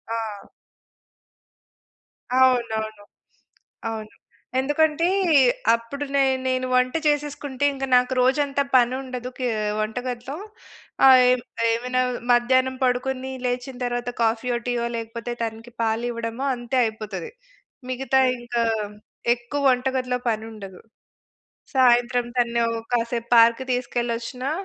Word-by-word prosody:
ఆ! 215 -3 -5 1.9
అవునవును. 220 -5 +1 0.9
అవును. 220 -1 -6 0.5
ఎందుకంటే? 305 +4 +2 0.7
అప్పుడు 275 +5 -6
నే 275 - +4 0.2
నేను 255 0 0
వంట 255 +1 +2
చేసేసుకుంటే 290 -2 -1
ఇంక 270 0 -3
నాకు 250 +1 +3
రోజంతా 280 +2 +2
పని 245 0 +5
ఉండదు, 250 -1 -6
కే 255 - 0 0.3
వంటగదిలో. 245 +5 -4 0.7
ఆహ్, 260 -1 +9
ఏమ్ 255 -1 0 0.3
ఏవై‌నా 250 +2 0 0.3
మధ్యాహ్నం 260 +2 +3
పడుకొని, 260 +1 -1
లేచిన 250 +1 -2
తర్వాత 245 0 -2
కాఫీ‌యో, 230 +2 +1
టీ‌యో 240 -1 0
లేకపోతే 230 +1 -5
తనకి 225 +2 -6
పాలు 225 +1 0
ఇవ్వడమో, 230 +3 -4
అంతే 240 +2 -3
అయిపోతది. 215 -4 -5 0.6
మిగతా 265 +1 +1 0.2
ఇంకా, 240 -1 -1 0.7
ఎక్కువ 245 +4 -5
వంటగదిలో 255 0 -1
పని 220 0 -2
ఉండదు. 195 -4 -10 0.9
సాయంత్రం 245 -1 +3
తనను 235 -1 +2
ఓ - - -3 0.2
కాసేపు 235 0 -1
పార్క్‌కి 230 +3 +5
తీసుకెళ్ళొచ్చినా, 245 +1 -2
245 Hz, 105 wpm, -23 LUFS, 230-260 Hz, 1.9 s, ఆహ్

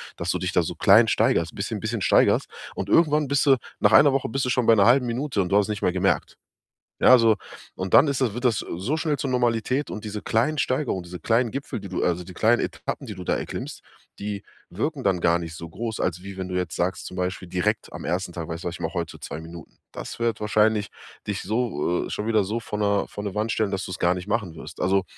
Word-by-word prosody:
dass 85 - -4
du - - +1
dich 90 -1 -2
da 90 - +3
so 85 +1 -4
klein 110 +6 +6
steigerst, 85 -5 +1
bisschen 105 +2 -3
bisschen 110 +1 -3
steigerst. - - +4 0.3
Und 95 - -4
irgendwann 150 -1 +4
bist 140 +1 +1
du 135 - +7 0.2
nach 105 - +4
1 140 +8 +7
Woche 135 - 0
bist 135 +2 -1
du - - -1
schon 125 -1 +1
bei 115 - +8
'ner 100 -2 +5
1/2 125 +1 +5
Minute 125 -2 -1
und 90 - -2
du 100 - +4
hast 105 +1 +2
nicht 105 -1 -3
mehr - - +2
gemerkt. 95 +1 0 0.6
Ja, - - +6
also, 115 -3 +6 0.4
und 95 0 -5
dann 150 - +7
ist 135 -1 -1
das 115 -5 +1
wird 125 +2 -5
das 115 -4 +3
so 95 - -3
schnell 155 -3 -1
zur 140 - -2
Normalität 125 +2 0
und 110 0 -6
diese 105 0 -5
kleinen 125 +8 +1
Steigerung, 130 -8 -1
diese 90 0 -9
kleinen 115 +4 +1
Gipfel, 140 -6 -5
die 100 - -8
du 95 - -2
also, 90 0 0
die 90 - -11
kleinen 115 +5 +3
Etappen, 140 - -4
die 105 - -7
du 90 -1 -8
da - - +1
erklimmst, - - -6 0.4
die 100 -1 -4 0.3
wirken 135 - -3
dann 95 -4 +2
gar 85 0 +4
nicht 85 -1 -7
so 85 0 -7
groß, 110 +5 -5
als 90 0 -2
wie 100 -1 -8
wenn 95 -1 -4
du 90 - -4
jetzt 90 -3 -2
sagst, 90 +2 -1
zum 90 - -9
Beispiel 90 0 -3
direkt 105 +4 -1
am - - -7
1. 90 +1 -2
Tag: 85 -2 -5
„Weißt 85 +1 -6
du, - - -3
was - - -7
ich - - -11
mache? 80 - -3
Heute 85 -3 -4
2 80 - -6
Minuten.“ 85 -1 -11
Das - - -7
wird 115 -2 0
wahrscheinlich 105 0 +2 0.4
dich 105 -1 -2
so 100 -6 -1
äh, - - -10
schon 105 - -3
wieder 110 -3 +3
so 115 +4 -3
vor 105 - -5
'ner 100 -1 +1
vor 105 - -7
'ne 100 -1 -4
Wand 110 +2 0
stellen, 110 -3 0
dass 95 +1 -2
du - - -7
es - - -6
gar 85 +1 +3
nicht 90 +1 -7
machen 105 -6 -2
wirst. - - -10
Also, 95 +1 +2
105 Hz, 260 wpm, -24 LUFS, 90-120 Hz, 0.6 s, bei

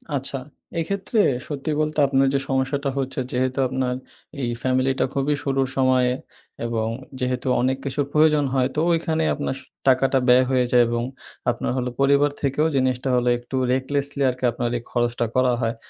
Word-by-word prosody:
আচ্ছা, 135 0 -2 0.4
এক্ষেত্রে 200 +6 -1 0.3
সত্যি 145 +1 -3
বলতে 155 0 -2
আপনার 135 0 +3
যে 140 - +2
সমস্যাটা 135 +1 0
হচ্ছে 135 -1 -2
যেহেতু 130 +2 0
আপনার 130 0 -1 0.5
এই 120 - -1
ফ্যামিলিটা 130 +1 +1
খুবই 140 +2 +1
শুরুর 135 -2 +1
সময়ে 130 -1 +3 0.5
এবং 115 -1 -1 0.3
যেহেতু 125 0 -2
অনেক 130 +1 +1
কিছুর 140 +1 -1
প্রয়োজন 150 -1 +4
হয় 130 -2 +2
তো - - 0
ওইখানেই 160 -1 +1
আপনার 145 -2 -3
স - - -11 0.3
টাকাটা 135 +1 +4
ব্যয় 125 +1 +6
হয়ে 130 -1 +3
যায় 125 -1 +6
এবং 120 0 -1 0.5
আপনার - - -3
হল 125 -1 -1
পরিবার 140 +1 +4
থেকেও 145 +3 +1
জিনিসটা 130 0 +1
হলো 125 0 +2
একটু 120 +2 -8 0.2
recklessly 140 +2 0
আরকি 125 +1 -6
আপনার 120 +1 -2
এই 120 - -8
খরচটা 120 -1 0
করা 130 -1 +3
হয়। 115 0 -1
130 Hz, 165 wpm, -23 LUFS, 125-140 Hz, 0.5 s, ব্যয়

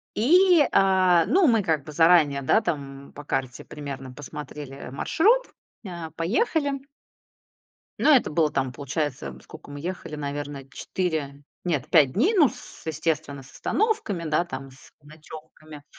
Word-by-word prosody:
И, 350 - +5
э, 185 -3 +4
мы 365 -4 +4
ну 225 -3 +3
как 155 -3 0
бы - - -9
заранее, 155 -4 +4
да, 220 - +3
там 140 -5 -5
по 145 - -10
карте 130 -3 -3
примерно 135 -3 -8
посмотрели 145 0 -9
маршрут, 430 - +2 0.4
э, 170 -4 -7
поехали. 275 - 0 1.1
Ну 310 - +3
это 260 - +4
было 155 -1 +2
там, 135 -3 -1
получается, 135 - -4
сколько - - -13
мы 145 - -7
ехали, 170 -3 -6
наверно, 145 -1 -6
4, 145 -3 -4 0.2
нет, 155 -5 -2
5 145 -7 +5
дней, 340 - +2
ну 305 -8 +6
с - - -13
естественно, 155 -3 -2
с 130 -1 -17
остановками, 415 - -1
да, 155 +3 +1
там 135 -4 -8
с 130 - -18
ночевками. 155 0 -13
155 Hz, 145 wpm, -25 LUFS, 140-190 Hz, 1.1 s, ну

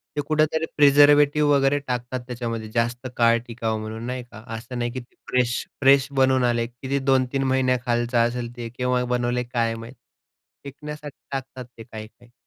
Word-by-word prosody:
ते 145 - 0
कुठेतरी 155 +1 +1
प्रिझर्व्हेटिव्ह 145 +1 +6
वगैरे 140 +1 +3
टाकतात 125 0 -3
त्याच्यामध्ये 115 -3 -4
जास्त 120 +2 -1
काळ 115 0 +5
टिकावं 115 -2 -2
म्हणून 110 +1 -6
नाही 125 0 -4
का. 110 -2 -13
असं 125 +2 -8
नाही 120 0 -1
की 130 - -5
ते 120 - -16
फ्रेश-फ्रेश 130 +2 +2
बनवून 130 -1 +3
आले. 120 -1 +1
किती 130 +3 -3
2-3 135 0 +1
महिन्यांखालचं 125 -2 +1
असेल 120 0 -5
ते, 115 -1 -5
केव्हा 125 0 +1
बनवलंय 125 0 0
काय 115 -1 +1
माहित. 115 +2 -9 0.7
टिकण्यासाठी 150 +1 -8
टाकतात 130 -1 -5
ते 115 - -9
काही-काही. 115 +1 -12
125 Hz, 155 wpm, -24 LUFS, 120-135 Hz, 0.7 s, प्रिझर्व्हेटिव्ह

